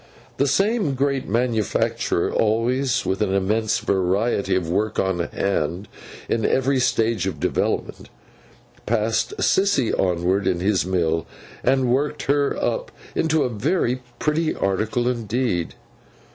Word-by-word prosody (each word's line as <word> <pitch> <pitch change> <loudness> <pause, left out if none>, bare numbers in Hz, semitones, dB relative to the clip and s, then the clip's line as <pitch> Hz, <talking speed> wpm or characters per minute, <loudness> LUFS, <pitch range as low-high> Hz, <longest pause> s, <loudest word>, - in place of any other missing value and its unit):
The 140 - +2
same 195 - +1
great 135 -2 -1
manufacturer, 115 -2 0
always 125 +4 +1
with 95 +2 -1
an 100 -2 +1
immense 105 +3 +1
variety 100 +3 0
of 90 -3 -1
work 105 +5 -1
on 95 -2 0
hand, 90 +1 -2 0.4
in 115 - 0
every 135 +3 +2
stage 115 -5 +1
of - - -4
development, - - -2 0.8
passed 115 - 0
Sissy 195 - +2
onward 90 +1 +1
in 90 -2 +1
his 95 0 +1
mill, 80 -3 0 0.4
and 130 -1 +2
worked 150 +3 -1
her 140 0 +1
up - - -2 0.2
into 160 -2 +1
a 130 - 0
very 125 - 0 0.2
pretty 155 +1 0
article 110 +5 0
indeed. 115 -6 -1
115 Hz, 125 wpm, -22 LUFS, 95-135 Hz, 0.8 s, The